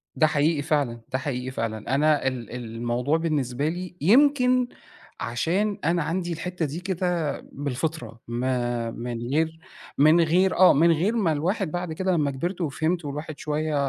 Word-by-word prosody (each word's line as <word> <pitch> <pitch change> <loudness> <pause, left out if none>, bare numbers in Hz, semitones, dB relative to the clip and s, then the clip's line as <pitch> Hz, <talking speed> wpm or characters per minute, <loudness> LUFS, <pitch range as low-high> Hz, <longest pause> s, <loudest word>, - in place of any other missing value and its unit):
ده 155 - +4
حقيقي 150 +1 +1
فعلًا، 140 -6 0
ده - - +3
حقيقي 130 -2 -3
فعلًا، 115 0 -2
أنا 150 -1 +3
ال 125 -3 -3
الموضوع 120 +4 -1
بالنسبة 145 -4 -1
لي 180 +1 -6
يمكن 250 - +4 0.5
عشان 180 - 0
أنا 170 +1 +2
عندي 170 +2 -2
الحتّة 175 +1 -3
دي 150 +3 -4
كده 175 -5 -1
بالفطرة 145 -1 -4
ما 120 -1 -1
من 120 0 -5
غير 160 +1 0 0.4
من 155 +4 +6
غير 180 +4 +2
آه، 185 - +8
من 165 +4 +5
غير 180 +8 +1
ما 200 -8 +2
الواحد 175 +4 -1
بعد 175 -1 -3
كده 185 +3 -1
لمّا 150 -5 +1
كِبرت 175 +7 -3
وفِهمت 160 +2 -1
والواحد 150 +1 -5
شويّة 155 0 -1
155 Hz, 155 wpm, -25 LUFS, 130-175 Hz, 0.5 s, آه